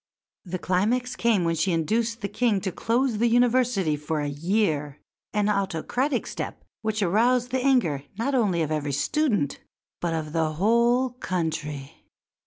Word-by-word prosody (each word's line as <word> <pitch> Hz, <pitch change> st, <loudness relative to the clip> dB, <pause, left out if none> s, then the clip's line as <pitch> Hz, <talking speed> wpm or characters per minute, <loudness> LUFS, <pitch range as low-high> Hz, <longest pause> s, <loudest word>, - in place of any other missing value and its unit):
The 185 Hz, 0 st, -3 dB
climax 220 Hz, +8 st, 0 dB
came 225 Hz, -6 st, +2 dB
when 165 Hz, 0 st, +1 dB
she 165 Hz, +3 st, 0 dB
induced 225 Hz, +8 st, 0 dB
the 200 Hz, -, -1 dB
King 225 Hz, -1 st, +1 dB
to 190 Hz, -, -2 dB
close 235 Hz, +4 st, 0 dB
the 235 Hz, -, +3 dB
University 240 Hz, -8 st, +2 dB
for 150 Hz, +1 st, -3 dB
a 145 Hz, -, -1 dB
year 150 Hz, -2 st, -1 dB, 0.3 s
an 210 Hz, -1 st, +1 dB
autocratic 210 Hz, -, 0 dB
step -, -, -6 dB, 0.2 s
which 220 Hz, -1 st, -1 dB
aroused 240 Hz, +6 st, +2 dB
the 260 Hz, -1 st, 0 dB
anger 240 Hz, -, +2 dB, 0.2 s
not 270 Hz, +5 st, -1 dB
only 200 Hz, -10 st, +2 dB
of 155 Hz, -, -3 dB
every 145 Hz, -2 st, -1 dB
student 210 Hz, -, 0 dB, 0.4 s
but 170 Hz, -1 st, -1 dB
of 155 Hz, -1 st, -4 dB
the 160 Hz, -2 st, 0 dB
whole 235 Hz, +8 st, +3 dB
country. 155 Hz, -, -4 dB
200 Hz, 155 wpm, -25 LUFS, 160-240 Hz, 0.4 s, the